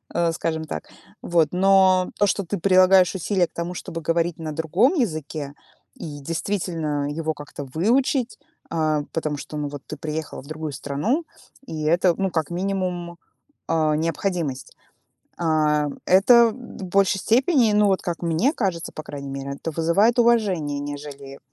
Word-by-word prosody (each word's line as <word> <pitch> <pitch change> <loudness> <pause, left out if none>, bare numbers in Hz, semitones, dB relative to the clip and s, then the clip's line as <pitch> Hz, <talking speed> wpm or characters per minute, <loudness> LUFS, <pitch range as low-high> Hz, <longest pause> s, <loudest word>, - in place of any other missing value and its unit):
э, 170 -1 +2
скажем 160 0 -2
так. 80 - -7 0.3
Вот, 165 -3 +2
но 185 0 +4
то, 205 - +4
что 200 +1 0
ты 195 +3 -3
прилагаешь 185 0 +5
усилия 185 0 +1
к - - -33
тому, 170 +1 -4
чтобы 165 -3 -6
говорить 165 +1 0
на 155 -2 -5
другом 175 - +2
языке 155 - -2 0.4
и, 145 -3 -7
действительно, 160 -3 -2
его 160 -1 -1
как-то 145 0 -8
выучить, 235 - 0 0.3
а, 155 -2 +1
потому 155 -2 -2
что, 150 - -8
ну, 145 -1 -2
вот 145 -1 -8
ты - - -6
приехала 155 -2 -5
в - - -16
другую 155 -1 -5
страну, 150 - -1 0.4
и 155 -1 -4
это, 175 +2 +3
ну, 195 -1 0
как 160 -2 -2
минимум, 180 -1 -2 0.5
а, 155 -2 +2
необходимость. 165 -4 -2 0.6
А, 155 -3 +2 0.2
это 230 +5 +6
в 240 -4 -10
большей 195 +1 +2
степени, 240 - +3
ну, 210 0 +4
вот 190 -1 +1
как 175 -1 -4
мне 170 - +2
кажется, 185 - -2
по 155 - -7
крайней 140 -2 -7
мере, 135 0 -5
это 165 - -5
вызывает 190 +10 +2
уважение, 190 -12 +2
нежели 145 -1 -7
170 Hz, 155 wpm, -23 LUFS, 155-195 Hz, 0.6 s, это